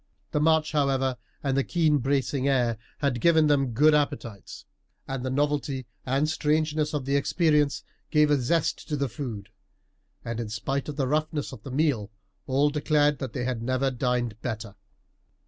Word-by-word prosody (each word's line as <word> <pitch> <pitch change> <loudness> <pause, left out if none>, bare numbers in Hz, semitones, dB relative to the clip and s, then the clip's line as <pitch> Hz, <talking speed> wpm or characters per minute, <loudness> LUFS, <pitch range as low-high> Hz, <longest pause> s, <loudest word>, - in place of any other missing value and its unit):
The - - +1
march, 160 0 +3
however, 135 -3 +1 0.3
and 135 -2 0
the 135 - +2
keen 155 -3 +2
bracing 135 +1 0
air 120 -5 +1 0.2
had 130 -5 0
given 160 -2 +5
them 145 -2 +3
good 150 +7 +5
appetites, 140 -8 -2 0.4
and 135 -2 -4
the 130 - -2
novelty 140 -1 -1 0.2
and 135 +4 +2
strangeness 155 0 0
of 140 -3 -2
the 140 +1 0
experience 150 0 +2 0.3
gave 150 -1 +4
a 145 -3 +3
zest 160 +6 0
to 150 - -1
the 140 0 0
food; 115 -5 -6 0.8
and 115 0 -3
in 115 -2 -4
spite 135 +7 -3
of 145 - -5
the 140 -2 0
roughness 155 +2 -1
of 130 -5 -10
the 135 - -9
meal, 130 -7 0 0.4
all 140 +3 +2
declared 150 -1 +2
that 130 -4 -5
they 125 - -2
had 125 -2 -2
never 130 +2 0
dined 120 -3 -1
better. 110 -4 -4
140 Hz, 170 wpm, -26 LUFS, 125-150 Hz, 0.8 s, given